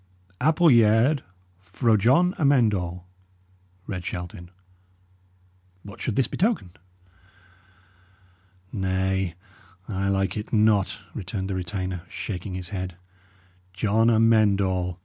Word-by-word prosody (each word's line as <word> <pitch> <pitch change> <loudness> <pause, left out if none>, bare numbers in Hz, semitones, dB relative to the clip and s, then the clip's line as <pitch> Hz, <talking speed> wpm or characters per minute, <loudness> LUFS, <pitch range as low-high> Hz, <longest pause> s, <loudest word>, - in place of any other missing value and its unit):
"'Appulyaird 130 -4 +4 0.4
fro 110 +5 +1
Jon 135 - +3
Amend 135 -8 +4
All,'" 90 -1 -4 0.8
read 90 -4 -5
Shelton. 90 0 -6 1.3
"What 100 0 -11
should 115 - -2
this 130 -1 +2
betoken?" 200 - -1 2.0
"Nay, 95 -2 -1 0.5
I 100 -1 -2
like 95 0 0
it 105 - -6
not," 105 -3 +2 0.2
returned 95 +1 -4
the - - -2
retainer, 90 0 -4
shaking 95 -1 -5
his 90 -1 -6
head. 90 -3 -5 0.8
"John 110 +4 +2
Amend 110 -3 +4
All! 90 -2 -1
100 Hz, 100 wpm, -25 LUFS, 95-115 Hz, 2.0 s, Appulyaird